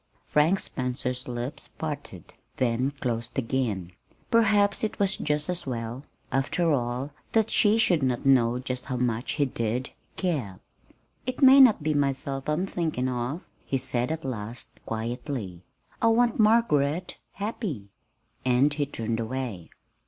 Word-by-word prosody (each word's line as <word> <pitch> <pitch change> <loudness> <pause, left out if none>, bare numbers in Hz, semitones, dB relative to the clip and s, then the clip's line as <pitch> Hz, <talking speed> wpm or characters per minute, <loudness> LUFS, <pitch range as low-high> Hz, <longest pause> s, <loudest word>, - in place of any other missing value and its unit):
Frank 160 +6 +3
Spencer's 125 0 -3
lips 125 +4 -4
parted, 145 - -6 0.2
then 125 +1 +1
closed 120 -4 -4
again. 115 -8 -1 0.4
Perhaps 205 -3 +4
it 220 - -1
was 200 -1 +2
just 150 0 -1
as 180 -4 -3
well, 120 +1 -4 0.3
after 160 +5 +1
all, 125 +2 -1 0.2
that 225 -1 +3
she 210 +1 +4
should 185 -8 +3
not 130 -1 0
know 125 -3 +4
just 130 0 -4
how 130 - -3
much 120 -1 -1
he 145 - +2
did 120 0 -2 0.2
care. 135 - -2 0.7
"It 255 +2 -2
may 265 +1 +9
not 245 - +7
be 155 0 +1
myself 135 -1 -1
I'm 155 +5 +1
thinking 160 -9 -1
of," 125 +6 -2 0.2
he 135 - -1
said 125 +1 -1
at 160 -2 -4
last, 115 -2 -5 0.2
quietly. 115 - -4 0.4
"I - - +4
want 235 +1 +3
Margaret 180 -8 +2
happy." 195 - -4 0.5
And 130 +3 +3
he 145 -1 -1
turned 115 -4 -3
away. 115 -6 -4
135 Hz, 140 wpm, -27 LUFS, 120-165 Hz, 0.7 s, may